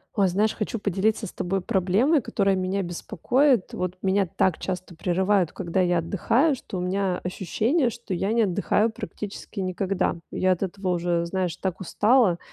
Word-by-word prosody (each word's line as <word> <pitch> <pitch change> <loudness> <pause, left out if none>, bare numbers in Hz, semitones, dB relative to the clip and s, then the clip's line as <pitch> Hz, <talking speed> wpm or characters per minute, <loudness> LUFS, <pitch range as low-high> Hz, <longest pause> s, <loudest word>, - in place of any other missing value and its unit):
Ой, 200 -2 +3
знаешь, 205 +4 +1
хочу 215 +2 -3
поделиться 200 +1 0
с - - -7
тобой 190 +2 -2
проблемой, 215 - +2
которая 195 -3 +1
меня 185 +2 -1
беспокоит. 230 - +1
Вот 180 -1 -3
меня 195 0 +2
так 170 +1 +1
часто 185 -1 -4
прерывают, 185 +1 +1
когда 185 0 -2
я 175 -1 +3
отдыхаю, 225 - +2
что 205 - -7
у - - -2
меня 185 0 0
ощущение, 225 - 0
что 235 -4 -6
я 195 +4 0
не 230 - +3
отдыхаю 205 +2 +2
практически 205 -2 -7
никогда. 185 0 -1
Я 185 - +1
от 185 +1 0
этого 195 0 -3
уже, 175 -1 0
знаешь, 180 -1 -2
так 185 -1 -3
устала, 210 0 +3
190 Hz, 170 wpm, -25 LUFS, 180-210 Hz, -, Ой